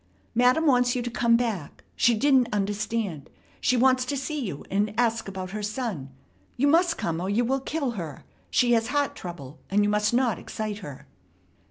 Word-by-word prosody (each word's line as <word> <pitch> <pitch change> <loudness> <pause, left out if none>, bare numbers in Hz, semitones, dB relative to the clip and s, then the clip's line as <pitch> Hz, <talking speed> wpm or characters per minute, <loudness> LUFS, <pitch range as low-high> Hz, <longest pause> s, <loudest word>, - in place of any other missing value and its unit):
"Madam 250 +7 +3
wants 250 -3 +3
you 245 - -1
to 240 - -4
come 235 -1 +3
back. 220 -10 -3
She 235 0 +4
didn't 260 0 +3
understand. 205 -5 -2 0.3
She 250 - +2
wants 255 +1 +4
to 280 +2 -2
see 295 +2 -3
you 165 -10 -6
and 205 +2 0
ask 230 -3 +1
about 190 -1 -6
her 215 +1 -4
son. 210 - -3 0.5
You 275 - +2
must 335 +2 +3
come, 165 0 -2
or 185 - -2
you 230 +4 +2
will 270 +3 +1
kill 275 -1 -2
her. 165 - -7 0.2
She 245 -1 +3
has 225 -1 +3
heart 285 +2 0
trouble, 160 -5 -8
and 205 +2 +3
you 205 - +2
must 210 0 +2
not 240 -5 +1
excite 215 -1 -5
her." 145 -8 -10
230 Hz, 190 wpm, -26 LUFS, 200-250 Hz, 0.5 s, She